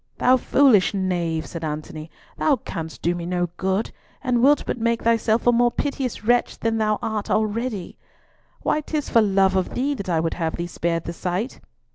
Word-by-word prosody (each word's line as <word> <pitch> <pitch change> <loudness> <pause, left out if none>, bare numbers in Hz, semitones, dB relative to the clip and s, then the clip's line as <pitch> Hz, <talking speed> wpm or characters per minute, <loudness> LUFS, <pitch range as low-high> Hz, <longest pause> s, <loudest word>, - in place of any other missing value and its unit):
"Thou 255 - +5
foolish 250 -6 +4
knave," 175 -4 -1
said 165 -1 -7
Antony, 155 +1 -5 0.3
"thou 300 - +2
canst 160 -8 -7
do 170 - +2
me 175 -1 -5
no 175 -1 -1
good, 190 +3 -1 0.3
and 250 -3 +1
wilt 285 +3 +5
but - - -3
make 230 0 0
thyself 230 0 +2
a 245 - +6
more 240 0 +4
piteous 265 -3 -3
wretch 240 +2 +2
than 225 0 -1
thou 215 -1 +1
art 215 -2 -2
already. 215 -2 -1 0.6
Why, 305 - +1
'tis 300 -1 -3
for 230 - +5
love 195 -2 +3
of 185 -1 -1
thee 275 +3 0
that 200 -8 -6
I 165 -2 +2
would 165 0 -1
have 165 -2 -2
thee 170 - -3
spared 170 -1 -2
the 170 - -5
sight." 185 +8 -3
210 Hz, 190 wpm, -23 LUFS, 175-240 Hz, 0.6 s, a